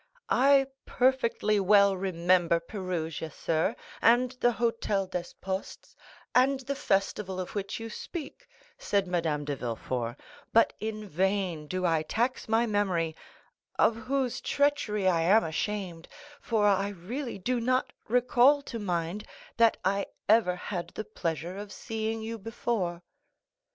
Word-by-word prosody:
"I 270 +2 +5 0.2
perfectly 240 -5 +2
well 200 0 +5
remember 175 -2 +2
Perugia, 165 -4 -4
sir, 160 +2 0 0.3
and 245 +2 +4
the 240 0 +4
Hôtel 220 -5 -1
des 175 -1 -3
Postes, 190 0 -5 0.4
and 265 +2 +4
the 275 +2 -3
festival 195 -6 -1
of 185 - -5
which 200 +1 -3
you 225 - -5
speak," 335 - -7 0.3
said 200 -1 +1
Madame 165 -5 -1
de 145 -1 -2
Villefort, 120 -1 -3 0.4
"but 230 - +5
in 215 -1 -4
vain 185 -3 -1
do 185 +3 -2
I 165 -2 +2
tax 235 +9 -1
my 225 +2 +3
memory, 185 -7 0 0.6
of 225 - +4
whose 255 +2 -2
treachery 285 -9 +1
I 170 -3 +3
am 200 +7 +5
ashamed, 175 +1 -3 0.3
for 220 -3 +1
I 200 -1 +3
really 230 +8 -5
do 245 +6 -1
not 255 +2 0
recall 250 +4 +4
to 235 -4 -6
mind 180 0 -2 0.3
that 230 -1 +5
I 195 +1 +1 0.2
ever 210 -4 +4
had 180 -1 -4
the 215 - -4
pleasure 175 -2 -4
of 205 -1 -8
seeing 220 +1 -3
you 225 +1 -5
before." 195 -5 -2
205 Hz, 135 wpm, -29 LUFS, 180-230 Hz, 0.6 s, I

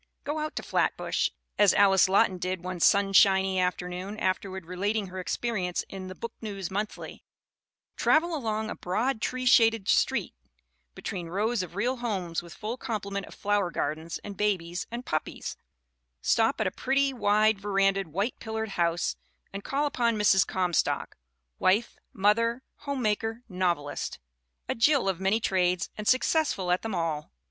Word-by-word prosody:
' - - -51
Go 295 +2 -2
out 305 0 -3
to - - -3
Flatbush, - - 0 0.3
as 205 -2 +6
Alice 195 -1 +5
Lawton 190 -1 +3
did 185 0 -3
one 180 -1 -4
sun 200 +2 +4
shiny 190 -1 +5
afternoon, 180 +2 -2
afterward 190 -2 -2
relating 200 +3 -2
her 185 +1 -6
experience 185 -2 -2
In 190 -1 -7
the 185 - -8
Book 230 +3 -6
News 200 -5 -5
Monthly; 210 +2 -5 0.7
travel 335 +2 +3
along 220 -5 -2
a - - -4
"broad, 220 +6 -1
tree 255 +1 -2
shaded 225 -4 +5
street - - +2 0.6
between 180 -4 -5
rows 210 +5 0
of 180 -1 -7
real 245 +6 0
homes 190 -9 -2
with 170 -1 -12
full 225 +4 -4
complement 200 -4 -4
of - - -12
flower 205 -3 +1
gardens 160 +1 -3
and 205 -1 -7
babies 180 -4 -1
and 240 +2 -6
puppies; 155 - -3 0.6
stop - - +2
at - - +1
a - - 0
pretty, 275 +1 +1
wide 215 -2 +3
verandaed, 195 -1 +1
white 200 - -2
pillared 220 -1 -4
house 170 -2 0 0.4
and 195 0 -6
call 280 +2 0
upon 235 -5 +1
Mrs. 200 -2 +4
Comstock, 180 -2 0 0.4
wife, 210 +6 +2 0.2
mother, 230 +5 +2 0.2
home 280 -3 -2
maker, 225 +2 -1
novelist 175 -7 -2 0.5
a - - 0
Jill 265 0 +3
of 190 -2 0
many 195 +4 +2
trades 180 -4 +1
and 210 0 -6
success 295 +4 +3
ful 180 -2 -2
at 180 - +2
them 220 -3 -3
all!" 160 -3 -2
200 Hz, 160 wpm, -28 LUFS, 185-225 Hz, 0.7 s, as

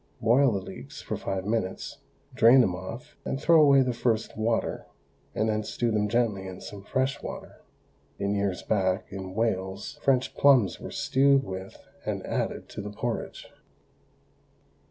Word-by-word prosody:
Boil 125 +4 +4
the 100 - -1
leeks 70 -7 -10
for - - -4
five 95 -1 -3
minutes, 105 -3 -2 0.3
drain 120 +4 +7
them 95 -7 +2
off, 95 +7 -8
and 135 - -3
throw 165 +1 +5
away 140 -2 +6
the 125 -1 -1
first 115 -1 -1
water, 115 +1 -1 0.5
and 110 - +1
then 110 0 0
stew 120 +2 -1
them 105 -1 +1
gently 105 -4 0
in 90 -1 -8
some 100 - -9
fresh 130 +5 -1
water. - - -8 0.6
In 100 +1 -1
years 100 -2 -1
back, 95 -3 0
in 95 -1 -7
Wales, 95 -3 -2
French 130 -2 +2
plums 130 -8 +4
were - - -7
stewed 135 +1 +3
with 95 -4 -7 0.3
and - - -3
added - - -2
to - - -6
the 105 - -6
porridge. 115 +3 -4
110 Hz, 155 wpm, -27 LUFS, 95-125 Hz, 0.6 s, drain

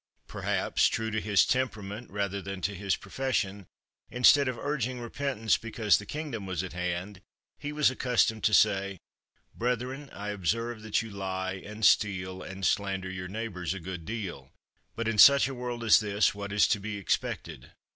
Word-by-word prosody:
Perhaps, - - +1
true 110 0 -2
to 110 0 -1
his 105 -2 +4
temperament 110 -3 -2
rather 100 0 -2
than 95 +1 -6
to 100 +4 -1
his 100 0 -1
profession, 100 -8 -2 0.4
instead 130 +3 +5
of 130 -2 -2
urging 130 -2 -2
repentance 120 -2 0
because 110 -2 +1
the 105 - -10
kingdom 140 -10 -5
was 95 -2 -2
at 95 - -7
hand, 90 +2 -4 0.4
he 145 - -4
was 150 -2 +3
accustomed 120 -4 +1
to 110 - +4
say: 100 -2 +3 0.6
"Brethren, 125 +4 -2
I 105 +1 -6
observe 110 +4 -2
that 110 +1 0
you 115 - -9
lie 95 -1 -3
and 105 +1 -3
steal 95 -3 +2
and 95 0 -5
slander 95 -1 0
your 90 -1 -5
neighbors 95 -3 -4
a - - -5
good 90 -1 -6
deal. 85 - -6 0.4
But 115 0 -2
in 115 -2 0
such 140 +2 +8
a 135 - -5
world 120 -1 -5
as 110 - +7
this 105 -1 +1
what 100 0 -6
is 105 0 +4
to 105 - +2
be 105 +1 -5
expected? 100 - -3
105 Hz, 175 wpm, -29 LUFS, 95-120 Hz, 0.6 s, such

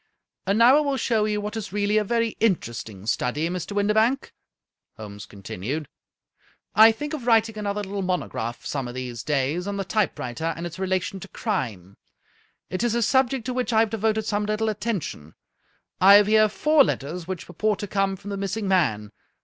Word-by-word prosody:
" - - -50
And 200 +2 +2
now 245 +5 +7
I - - +5
will 280 -2 0
show 225 -4 +1
you 210 -1 -1
what 210 +2 -5
is 215 -4 -5
really 205 +1 +1
a - - 0
very 230 +1 0
inter 190 - +1
esting 105 -3 -8
study, 145 +7 0
Mr. 180 +2 -4
Windibank," 220 +6 +1 0.6
Holmes 105 -2 -9
continued. 105 - -5 0.5
" - - -37
I 220 +1 +9
think 295 +7 -6
of 260 -6 -5
writing 225 -1 +3
another 210 -1 -3
little 200 0 -4
monograph 175 -10 -3
some 135 -3 -3
of 120 - -8
these 125 -3 -5
days 150 - -1
on 200 0 -3
the 195 - -1
typewriter 165 - -1
and 170 - -5
its 175 +1 -7
relation 190 0 -1
to 195 - -9
crime. 110 - -4 0.7
It 185 - -2
is 235 -1 +1
a 235 - +2
subject 260 0 +2
to 255 - -2
which 250 0 -1
I 220 -1 +4
have 225 -2 +1
devoted 220 0 0
some 210 -1 -1
little 215 +1 0
attention. 200 - -4 0.6
I 195 +2 +8
have 205 0 +7
here 215 +1 +4
four 300 +6 +4
letters 165 - -3
which 185 -2 -5
purport 210 +3 -1
to 205 - -5
come 195 0 0
from 205 +2 -9
the 200 - -3
missing 200 +2 -3
man. 110 - +1
200 Hz, 200 wpm, -24 LUFS, 160-220 Hz, 0.7 s, I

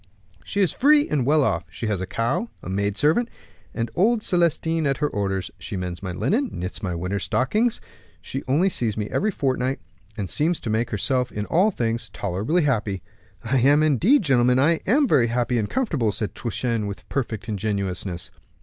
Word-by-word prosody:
"She 200 - -1
is 185 - +3
free 295 +2 +4
and 135 -5 0
well 150 0 +4
off; - - 0
she - - -6
has 105 -4 -1
a 95 - -3
cow, 115 +3 -1
a - - -6
maid 100 +1 -1
servant 165 - +2 0.4
and 115 0 -3
old 215 +5 +3
Celestin 165 -3 +1
at 135 -1 +1
her 150 - +1
orders; 95 -5 -2
she 100 - -5
mends 90 -1 -4
my 95 -2 -4
linen, 235 - 0
knits 90 +3 -5
my 90 -5 -2
winter 90 +4 -2
stockings; 215 - +1 0.4
she 135 +9 -5
only 150 +9 +3
sees 115 - 0
me 105 -1 -3
every 215 - +1
fortnight, 130 - -1 0.4
and 100 -3 -2
seems 155 - 0
to 110 - -3
make 110 +2 0
herself 125 +4 0
in 105 0 -3
all 185 - +3
things 115 - -2
tolerably 105 - -1
happy. 105 - 0 0.4
"And 135 +5 +4
indeed, 180 - +4
gentlemen, 125 -4 +3
I 155 +5 +3
am 275 +7 +4
very 130 - +4
happy 120 0 0
and 105 - -2
comfortable," 155 - 0
said 105 0 -3
Truchen, 115 -2 -2
with 100 -3 -7
perfect 115 -6 -3
ingenuousness. 100 -4 -3
125 Hz, 185 wpm, -23 LUFS, 105-155 Hz, 0.4 s, free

